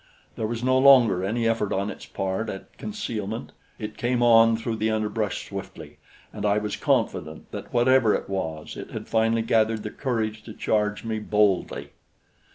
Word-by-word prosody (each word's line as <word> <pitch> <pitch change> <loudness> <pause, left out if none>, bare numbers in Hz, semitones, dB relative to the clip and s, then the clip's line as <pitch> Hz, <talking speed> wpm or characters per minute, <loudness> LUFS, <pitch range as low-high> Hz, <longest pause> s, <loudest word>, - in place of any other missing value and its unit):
There 110 - -2
was 115 +1 -4
no 130 +1 +3
longer 125 -9 +6
any 115 +4 0
effort 115 -3 0
on 100 +2 -1
its - - -10
part 95 +3 -2
at 95 - -8
concealment; 115 - -4 0.3
it 105 -1 -6
came 120 0 +1
on 115 -1 +6
through 115 0 -3
the 110 +1 0
underbrush 110 -1 -2
swiftly, - - -8 0.3
and 105 - -6
I 105 0 +3
was 105 -1 -2
confident 80 0 -1
that - - -7
whatever 120 -2 +4
it - - -4
was, 80 -6 -4
it - - -7
had - - -7
finally 115 0 +2
gathered 110 -1 +2
the 105 - -5
courage 110 -5 -2
to 110 - -8
charge 105 0 0
me 110 -1 -2
boldly. 100 -9 +1
110 Hz, 170 wpm, -25 LUFS, 105-115 Hz, 0.3 s, longer